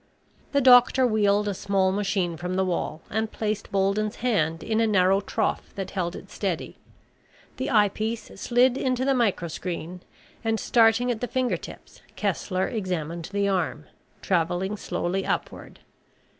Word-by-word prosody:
The 280 - +2
doctor 255 0 +6
wheeled 210 -2 +2
a 205 - 0
small 190 0 +1
machine 195 -3 -1
from 180 +2 -4
the 190 0 +1
wall 170 -3 -3
and 220 +1 -1
placed 215 -1 -3
Bolden's 200 +2 +1
hand 165 -10 0
in 225 0 0
a 225 - +3
narrow 195 -1 +3
trough - - -2
that 195 -2 -5
held 180 -2 -2
it - - -11
steady. - - -3 0.8
The - - -2
eyepiece 215 0 +1
slid 250 +1 +3
into 255 0 0
the 275 - +3
microscreen 180 - -2 0.4
and, 225 -1 0
starting 235 +1 +3
at 225 - -4
the 245 - -1
finger 255 +1 0
tips, - - -11
Kessler 185 -1 -1
examined 170 -6 -3
the 200 0 0
arm, 180 -6 -1 0.4
traveling 180 +3 0
slowly 180 -1 -2
upward. - - -4
200 Hz, 145 wpm, -25 LUFS, 185-225 Hz, 0.8 s, doctor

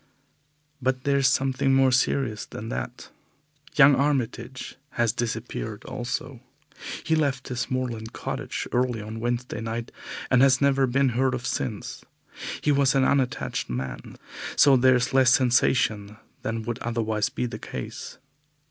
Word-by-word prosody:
But 130 0 0
there 140 -1 +2
is 135 - +4
something 135 0 +2
more 135 -1 +5
serious 125 -2 +1
than - - -7
that. - - -5 0.6
Young 140 -1 +8
Armitage 130 -3 -1 0.2
has 120 -2 +2
disappeared 115 - -4
also. 125 +1 -4 0.6
He 160 - +2
left 140 -5 0
his 125 -2 -3
moorland 120 -4 -3
cottage - - -4
early 125 -2 +1
on 110 +1 -6
Wednesday 120 -1 -2
night 115 +1 -4 0.4
and 125 -1 +5
has 135 -1 +5
never 135 -1 +3
been 135 +2 +2
heard 130 +2 +1
of 130 - -6
since. 105 -4 -3 0.6
He 150 - +2
was 140 -1 +3
an 135 - +4
unattached 130 -1 0
man, 65 +1 -5 0.4
so 140 -2 +6
there 130 0 +5
is 125 +2 0
less 130 -1 +5
sensation 120 -5 +2 0.2
than 115 0 -3
would 120 +1 -4
otherwise 110 -3 -1
be - - -2
the 120 - -5
case. - - -7
125 Hz, 145 wpm, -25 LUFS, 115-135 Hz, 0.6 s, Young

